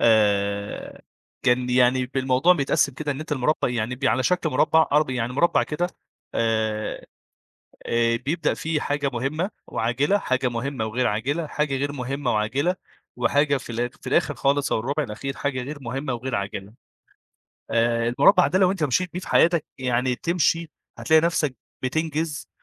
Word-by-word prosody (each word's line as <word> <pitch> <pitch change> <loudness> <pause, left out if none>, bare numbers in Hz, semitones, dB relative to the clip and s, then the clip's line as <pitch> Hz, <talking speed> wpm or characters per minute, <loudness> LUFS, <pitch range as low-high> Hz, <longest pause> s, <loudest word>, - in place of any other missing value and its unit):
آآ 100 -2 +1 0.4
كان 125 0 +2
يعني 125 0 +3
ب 135 - -11
الموضوع 130 +6 +4
بيتقسّم 140 -3 +1
كده 145 +1 -2
إن 140 - -7
أنت 155 -1 -5
المربّع 140 +1 +1
يعني 120 0 -2
بي 130 +1 0
على 130 - +1
شكل 180 -1 +1
مربّع 160 +3 +3
أرب 150 -2 +3
يعني 125 -1 -2
مربّع 170 +6 +3
كده. 170 +4 -1 0.5
آآ 110 -1 -1 0.8
آآ 115 0 +2
بيبدأ 155 +4 -1
فيه 160 -1 -2
حاجة 145 -1 -1
مُهمّة 150 - -1 0.2
وعاجلة، 130 - +1
حاجة 130 -7 0
مُهمّة 120 0 -3
وغير 120 +3 0
عاجلة، 140 +10 -1
حاجة 150 -2 -1
غير 140 +1 -1
مُهمّة 135 -1 -2
وعاجلة 130 +12 0 0.4
وحاجة 145 0 +2
في 125 - -8
الآخ 120 +1 -2
في - - -9
الآخِر - - +2
خالص 140 +1 +1
أو - - +2
الرُبع 140 +6 -1
الأخير 135 +4 -5
حاجة 130 -3 -2
غير 145 +3 -6
مُهمّة 135 +3 -3
وغير 120 0 -3
عاجلة. 100 +1 -5 1.0
آآ 115 0 +2
المربع - - +6
ده 185 +6 +1
لو 185 -1 +4
أنت 180 -6 -3
مشيت 165 +6 0
بيه 180 - -3
في - - -10
حياتك 170 -2 +4
يعني 125 0 0
تمشي 165 -1 0 0.3
هتلاقي 160 -1 +4
نَفْسك 155 -5 0 0.3
بتنجِز 155 +2 -2
135 Hz, 165 wpm, -24 LUFS, 120-150 Hz, 1.0 s, المربع